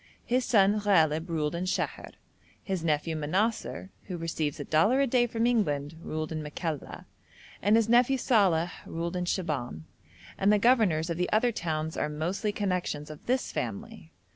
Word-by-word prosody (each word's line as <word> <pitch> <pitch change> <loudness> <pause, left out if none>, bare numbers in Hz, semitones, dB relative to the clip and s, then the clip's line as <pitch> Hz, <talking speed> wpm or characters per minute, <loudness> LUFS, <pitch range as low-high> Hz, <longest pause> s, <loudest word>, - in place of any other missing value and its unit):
His 250 +1 +1
son 205 -2 +4
Ghalib 165 -5 +2
ruled 155 -2 -1
in 170 +2 -2
Sheher, 185 - -3 0.5
his 190 -4 -3
nephew 160 0 0
Manassar, 190 +5 -1
who 180 -3 -5
receives 160 -3 -3
a - - -3
dollar 210 - +3
a 275 - +4
day 245 -1 +2
from 230 0 -1
England, 150 -12 +1
ruled 155 -1 -4
in 155 -1 -3
Makalla, 150 0 -5 0.6
and 205 +3 +4
his 225 -1 +3
nephew 245 +3 +4
Salàh 185 -9 +2 0.2
ruled 170 +2 -4
in 180 0 -1
Shibahm, 145 - -2 0.6
and 200 - +4
the 210 - +5
governors 200 -8 +3
of 165 - -2
the 180 - -1
other 235 +3 +3
towns 160 -5 -3
are - - -1
mostly 175 +8 -2
connections 180 -7 -2
of 155 - -13
this 255 +2 0
family. - - -5
180 Hz, 165 wpm, -28 LUFS, 155-215 Hz, 0.6 s, the